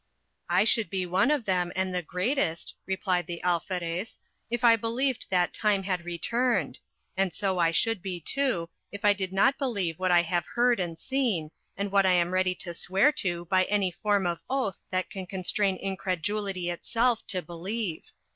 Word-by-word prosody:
I 180 +3 +4
should 220 -3 +3
be 185 0 -1
one 185 +8 +2
of 295 -6 +1
them, 180 -2 +1
and 190 -1 -1
the 180 - 0
greatest, 180 - -1
replied 185 -3 0
the 170 -1 -5
Alferez, 175 +2 -2 0.3
if 240 +1 -2
I 230 -1 +8
believed 235 +4 -1
that 180 -2 +2
time 205 -3 +1
had 185 -2 -2
returned; 235 +8 0 0.4
and 190 -1 +1
so 190 +2 -1
I 165 -1 +4
should 215 +4 +1
be, 185 -2 -4
too, 235 - 0 0.2
if 205 +2 -6
I 205 - +7
did 190 -2 -3
not 230 +8 +3
believe 200 - -1
what 185 0 +1
I 175 -1 +5
have 175 0 -1
heard 240 -2 +3
and 170 -3 -3
seen, 225 - -1 0.3
and 200 0 -2
what 195 -1 +4
I 185 - +5
am 175 0 +2
ready 185 0 +2
to 175 -1 -4
swear 190 - +3
to 175 -2 -2
by 185 +1 +3
any 200 -2 +1
form 205 +1 0
of 170 -1 -1
oath 260 -7 -1
that 185 0 -2
can 190 -2 -6
constrain 190 +1 0
incredulity 190 0 -2
itself 230 +6 +1
to 185 -4 -2
believe. 180 +1 -4
190 Hz, 185 wpm, -28 LUFS, 175-215 Hz, 0.4 s, I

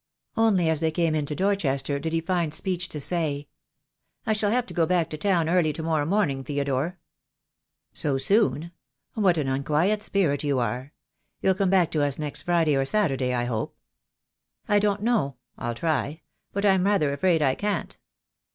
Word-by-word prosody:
Only 210 -7 +3
as 160 -2 +1
they 160 0 +1
came 165 0 0
into 150 -1 -1
Dorchester 145 -8 0
did 160 +3 -3
he 165 0 0
find 170 -2 -1
speech 180 -2 -1
to 150 - -4
say, 145 -2 -1 0.4
— - - -51
"I 220 - +2
shall 210 -1 0
have 245 +3 +1
to - - -9
go 165 -3 +2
back 175 -3 +1
to - - -3
town 175 -3 +2
early 170 -2 +2
to 160 - -6
morrow 155 -2 0
morning, 165 -9 +1
Theodore! 140 +4 -2 0.5
" - - -58
"So 140 -2 +1
soon. 170 +1 +2 0.4
What 190 -6 +2
an 145 -3 -1
unquiet 150 +10 +1
spirit 165 -10 0
you 140 -2 +1
are! 125 +3 -2 0.5
You'll 190 - +3
come 190 0 0
back 185 -3 +3
to 155 - 0
us 145 -2 0
next 150 -2 -3
Friday 165 -4 +2
or 135 - +2
Saturday, 135 -6 0
I 120 - 0
hope." 115 -3 -3 0.9
"I 205 - +4
don't 205 0 0
know. 215 - +1 0.2
I'll 120 -2 -4
try; 155 +1 -1 0.3
but 200 +1 -1
I'm 190 -2 +4
rather 195 -9 +2
afraid 165 +1 +2
I 135 -2 +3
can't." 205 +6 -2
160 Hz, 185 wpm, -25 LUFS, 140-190 Hz, 0.9 s, I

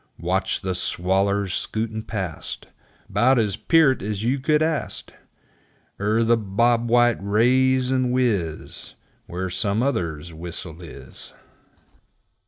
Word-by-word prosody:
Watch - - -1
the 95 -1 -2
swallers 95 +2 0
skootin' 110 +2 -2
past 95 -8 -5 0.4
'Bout 120 +7 +3
as 105 -4 +1
peert 160 -5 +3
as 105 0 -3
you 130 +4 +1
could 150 +3 +2
ast; 160 -1 -2 0.9
Er 105 +3 +2
the 115 +1 +4
Bob 115 +3 +1
white 120 0 +4
raise 125 +5 +3
and 130 -1 +1
whiz 105 -11 -1 0.3
Where 90 +1 -4
some 105 +4 0
other's 85 - -2
whistle 85 0 -6
is. 70 -6 -8
110 Hz, 115 wpm, -23 LUFS, 95-125 Hz, 0.9 s, the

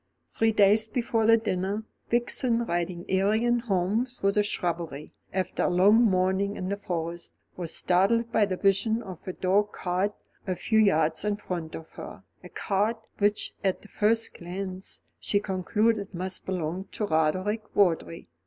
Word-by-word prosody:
Three 225 0 +2
days 210 +1 +4
before 225 -1 0
the 230 0 +7
dinner, 205 -1 -2 0.3
Vixen, 240 0 +1
riding 175 -1 -2
Arion 220 +6 +2
home 210 +2 0
through 220 -6 -1
the 210 - +2
shrubbery, 170 -7 -3 0.2
after 185 -1 -2
a - - +2
long 190 +5 +5
morning 190 0 +1
in 185 - -4
the 200 - 0
Forest, 170 -3 -5 0.2
was 170 -3 -5
startled 225 +6 +2
by 220 -2 +4
the 185 -2 -3
vision 220 +4 +2
of 185 -4 -10
a 185 - -3
dog 200 +3 +1
cart 185 +3 -1 0.3
a 185 - 0
few 220 +4 +1
yards 160 -6 +3
in 210 -1 0
front 175 -6 -5
of 160 - -10
her, - - -10 0.2
a - - -10
cart, 210 +4 0 0.2
which, 205 0 +1
at 190 -2 0
the 210 - -15
first 225 +2 +1
glance, 185 +2 -5 0.2
she 200 - +1
concluded 205 +1 0
must 185 +2 -5
belong 180 0 -3
to 210 - -1
Roderick 185 +6 0
Vawdrey. 170 - +1
195 Hz, 160 wpm, -27 LUFS, 180-215 Hz, 0.3 s, the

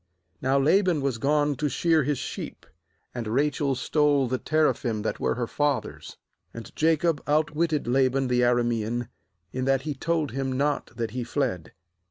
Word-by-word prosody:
I9Now 135 +1 +2
Laban 180 -2 +3
was 135 -4 -1
gone 145 +3 +2
to 150 +3 0
shear 165 +2 +2
his 145 0 0
sheep. - - -6 0.5
And 120 -3 -4
Rachel 140 +3 +1
stole 145 0 +2
the 130 +1 -1
teraphim 135 -8 0
that - - -2
were - - 0
her 120 -1 -1
father's. 145 +3 -2 0.4
20And 115 - -9
Jacob 160 -1 +2
outwitted 155 +1 +1
La 130 +2 +3
ban 135 +1 -1
the 125 0 +2
Aramean, 120 -1 0 0.4
in 130 0 -2
that 135 0 +2
he 150 -1 -2
told 155 -1 -1
him 135 +1 -2
not 145 +3 0
that 115 -2 -3
he 125 +1 -3
fled. 90 - -2
135 Hz, 165 wpm, -26 LUFS, 120-150 Hz, 0.5 s, Laban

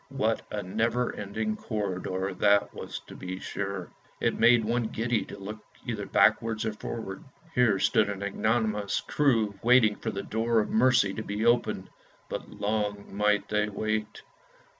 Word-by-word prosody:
What 135 -5 0
a 105 -1 -3
never 115 +6 0
ending 110 +2 -2
corridor 95 -3 -3
that 100 0 +3
was - - -6
to - - -13
be 95 0 -6
sure; 95 -4 -4 0.3
it - - +1
made 115 -1 +6
one 120 +1 0
giddy 115 +1 0
to - - -9
look 105 +2 -7 0.3
either - - -3
backwards 115 -1 +3
or 110 - -1
forwards. 105 -2 -6 0.3
Here 120 -5 +4
stood 110 +1 +3
an 100 -1 -4
ignominious 105 0 0
crew 115 -9 +1
waiting 120 -3 +5
for 115 - -3
the 100 -2 -4
door 115 +1 +1
of 105 - -1
mercy 120 -4 +4
to 110 - -4
be 105 +2 -2
opened, 120 +1 +1 0.4
but - - -5
long 105 -1 -2
might 105 -1 +2
they 105 0 +1
wait. 110 +1 -3
110 Hz, 160 wpm, -28 LUFS, 100-115 Hz, 0.4 s, made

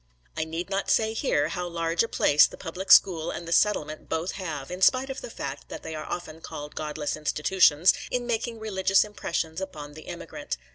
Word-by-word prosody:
I - - -1
need 165 +4 -5
not 195 +1 -1
say 220 0 +3
here 155 - +1
how 175 +1 -3
large 165 -1 0
a 230 - +1
place 150 -8 +5
the - - -12
public 185 +4 -4
school 170 -3 +6
and 170 - -5
the - - -5
settlement 155 -5 +1
both 160 +3 -1
have 155 -7 -5
(in 180 +1 -6
spite 260 +6 +4
of 265 - -6
the - - -7
fact - - -6
that - - -8
they 160 - -6
are 155 - -6
often 165 -2 -6
called 150 -2 -7
godless 150 -1 -3
institutions) 155 +2 +4 0.2
in 245 -1 -1
making 235 0 -2
religious 195 -3 +2
impressions 170 -5 -3
upon 150 -6 -7
the 155 +1 -12
immigrant. - - -6
170 Hz, 200 wpm, -26 LUFS, 155-195 Hz, 0.2 s, school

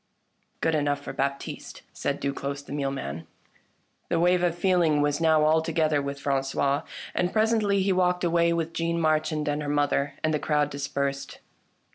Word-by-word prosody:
" - - -45
Good 165 - +1
enough 145 -2 +1
for - - -6
Baptiste! 140 0 -4
" - - -39
said 140 - -2
Duclosse 140 0 -3
the - - -13
mealman. 135 - -3 0.8
The 170 - +1
wave 180 +1 +3
of 175 -1 0
feeling 175 -5 +3
was 145 +1 0
now 160 -2 +4
altogether 160 -1 +2
with 140 0 -5
Fran 140 -1 0
cois, 140 +1 0 0.3
and 180 0 0
presently 215 -3 +2
he 195 0 +2
walked 180 -1 +1
away 170 0 +3
with 165 -1 -1
Jeanne 170 0 -1
Marchand 155 -1 +1
and 145 0 0
her 145 - -3
mother, 145 -1 0
and 155 - +1
the 150 - +1
crowd 150 -1 +1
dispersed. 140 0 -3
155 Hz, 175 wpm, -26 LUFS, 140-170 Hz, 0.8 s, now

